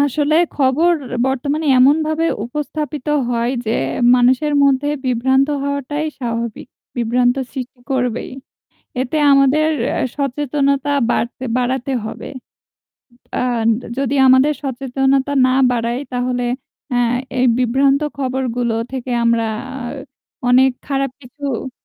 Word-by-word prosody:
আসলে 290 +2 +1 0.2
খবর 290 +6 +3 0.3
বর্তমানে 280 +4 -1
এমনভাবে 310 +4 +3 0.2
উপস্থাপিত 295 +2 -4 0.2
হয় 235 0 0 0.2
যে, 220 - 0 0.4
মানুষের 255 +4 +3
মধ্যে 280 +1 +3 0.2
বিভ্রান্ত 265 +2 +2 0.2
হওয়াটাই 280 +2 -2
স্বাভাবিক। 235 -2 -4 0.3
বিভ্রান্ত 245 +1 +2 0.2
সৃষ্টি 255 -2 -7
করবেই। 250 -3 -1 0.7
এতে 265 +4 -2
আমাদের 275 +3 +4 0.2
অ্যাঁ - - -1
সচেতনতা 280 0 0 0.2
বাড়তে 250 +2 -2
বাড়াতে 255 +1 -1
হবে। 220 - -7 1.1
আর 240 -3 0 0.3
যদি 275 0 0
আমাদের 260 +3 +5
সচেতনতা 270 +1 0
না - - +2 0.2
বাড়ায় 235 +1 -1
তাহলে 250 0 -1 0.5
অ্যাঁ 245 -1 +2 0.2
এই 255 - +3
বিভ্রান্ত 270 +3 +2 0.2
খবরগুলো 250 -3 -1 0.2
থেকে 260 -1 -5
আমরা 230 -1 +2 1.0
অনেক 260 +2 +5 0.2
খারাপ 275 -1 -1
কিছু 265 0 -5
265 Hz, 105 wpm, -18 LUFS, 245-280 Hz, 1.1 s, আমাদের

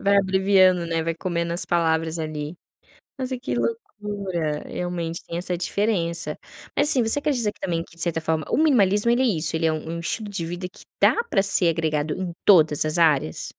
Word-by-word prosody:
vai 200 0 +3
abreviando, 190 -2 +3
né, 165 -1 -1
vai 165 0 -2
comendo 170 -1 -2
as 170 - -2
palavras 165 -1 0
ali. 155 +1 -5 0.6
Nossa, 260 -1 -3
que 260 - -3
loucura, 205 - -3
realmente 170 -2 -4
tem 170 - -5
essa 180 0 -3
diferença. 175 -2 -1 0.4
Mas 285 +1 +5
assim, 255 -5 +5
você 225 +6 +2
acredita 250 -8 0
que - - -26
também, 165 -2 -2
que 170 - -19
de 165 - -9
certa 165 -1 -1
forma, 160 -1 -1
o - - +1
minimalismo 235 -8 +3
ele 240 +2 +2
é - - +3
isso, 165 -8 0
ele 160 0 0
é 160 - +2
um 155 +1 -6
um - - -5
estilo 210 +5 -4
de 190 -5 -4
vida 175 +2 -5
que - - -17 0.2
dá 465 - +4
para 465 - +1
ser 195 -3 +2
agregado 155 -2 -1
em 185 -2 -4
todas 155 -6 +5
as 155 +2 -1
áreas? 145 - +2
175 Hz, 205 wpm, -23 LUFS, 165-205 Hz, 0.6 s, Mas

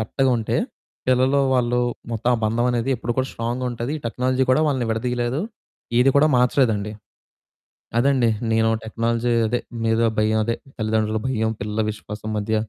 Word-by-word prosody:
కరెక్ట్‌గా 130 +5 +1
ఉంటే, 110 - -1 0.5
పిల్లలూ 130 +2 +3
వాళ్ళు, 125 -1 +2 0.3
మొత్తం 115 +2 0
ఆ - - -5
బంధమనేది 120 +2 0
ఎప్పుడు 120 0 -3
కూడా 130 0 +1
స్ట్రాంగ్‌గా 120 +2 -3
ఉంటది, 120 +4 -4
ఈ - - -15
టెక్నాలజీ 130 +2 0
కూడా 150 - +3
వాళ్ళని 130 -5 0
విడదీయలేదు, 120 +4 -1 0.6
ఏది 135 +2 +5
కూడా 155 +2 +5
మార్చలేదండి. 120 -5 +2 1.1
అదండీ, 130 -1 +3 0.2
నేను 110 0 +3 0.2
టెక్నాలజీ 115 +2 -1 0.2
అదే, 120 +2 0 0.3
మీద 115 0 +2 0.2
భయం 110 +1 +2
అదే, 115 +1 0 0.2
తల్లిదండ్రుల 110 -1 0
భయం, 110 -3 0
పిల్లల 105 +2 -1
విశ్వాసం 105 0 -8
మధ్య... 110 +1 -1
120 Hz, 145 wpm, -22 LUFS, 110-125 Hz, 1.1 s, ఏది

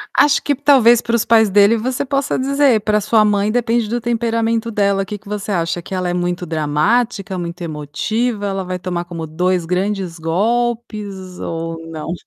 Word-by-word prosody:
Acho 290 -1 +4
que 285 - 0
talvez 255 -4 +5
para 235 0 -1
os 230 - +1
pais 220 -2 +4
dele 205 +3 +5
você 255 +3 -2
possa 275 0 -1
dizer, 275 -4 +3
pra 210 0 +1
sua 215 +1 +3
mãe 205 0 +1
depende 235 -1 +1
do 240 +3 -2
temperamento 230 -1 0
dela, 200 -2 +1
que 210 - -6
que 205 +1 -20
você 210 0 -4
acha? 170 -1 -1
Que 190 - -9
ela 180 -1 -1
é - - -1
muito 175 0 -2
dramática, 185 +7 0
muito 175 0 -6
emotiva, 200 - -2
ela 195 -1 -2
vai 185 0 -4
tomar 175 -1 -3
como 165 -2 -6
2 180 +2 0
grandes 185 0 -2
golpes 205 +1 -2
ou 165 0 -4
não? 160 +1 -5
205 Hz, 180 wpm, -18 LUFS, 175-230 Hz, -, talvez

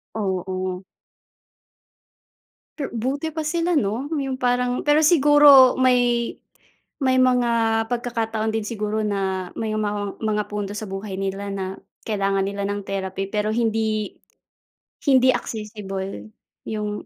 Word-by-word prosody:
Oo. 185 -2 -3 2.0
Per 280 - -4
buti 270 +7 -2
pa 320 - -5
sila, 340 +2 0
'no, 235 +9 -3
'yong 270 -4 -2
parang 250 0 0
pero 295 +1 +4
siguro 290 -5 +7
may 245 -2 +2 0.7
may 260 0 +3
mga 235 -3 +2
pagkakataon 225 -2 -2
din 220 -1 -1
siguro 215 0 -2
na 190 -3 -2
may 215 -1 -2
mga 205 -1 -2
mga 210 -1 +1
punto 205 -1 -4
sa 210 0 -6
buhay 195 0 -5
nila 195 +1 -3
na 190 -1 -4 0.3
kailangan 195 -2 0
nila 200 0 -4
ng 205 0 -2
therapy 195 0 -3
pero 210 +1 -1
hindi 220 -2 -1 0.9
hindi 260 -2 +5
accessible 195 - -4 0.4
'yong 210 -1 -4
215 Hz, 120 wpm, -23 LUFS, 200-250 Hz, 2.0 s, siguro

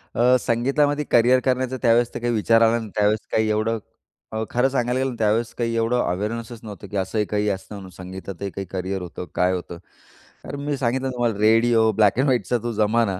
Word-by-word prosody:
अ, 125 +2 +4
संगीतामध्ये 145 +6 +1
करियर 120 +2 +5
करण्याचा 130 0 0
त्यावेळेस 120 0 +3
तर - - -4
काही 120 0 -1
विचार 115 +1 +3
आला 115 +1 +4
नाही. 110 -2 -7
त्यावेळेस 105 +1 +2
काही 110 0 +1
एवढं, 110 +1 0 0.5
अ, 110 0 -2
खरं 125 +2 +2
सांगायला 125 -1 0
गेलं 135 0 0
ना - - -7
त्यावेळेस 110 +2 +1
काही 115 -1 -1
एवढं 115 +2 +1
अवेअरनेसच 110 +5 -3
नव्हतं, 105 -2 -9
की 100 - -5
असं 95 +3 0
काही 105 0 0
असतं 100 +1 -5
म्हणून 95 -2 -10
संगीताही 95 +2 -7
काही 95 - -5
करियर 95 0 -3
होतं, 90 0 -7
काय 90 +1 +2
होतं. 85 -1 -5 0.7
कारण 140 - -6
मी 145 -1 -1
सांगितलं 130 +1 -1
ना 130 - -2
तुम्हाला 120 -4 -1
रेडिओ 110 +1 +4
ब्लॅक 105 -1 +3
अँड - - +4
व्हाइटचा 125 -1 +1
तो 120 - -2
जमाना. 105 -2 +1
115 Hz, 205 wpm, -23 LUFS, 105-120 Hz, 0.7 s, करियर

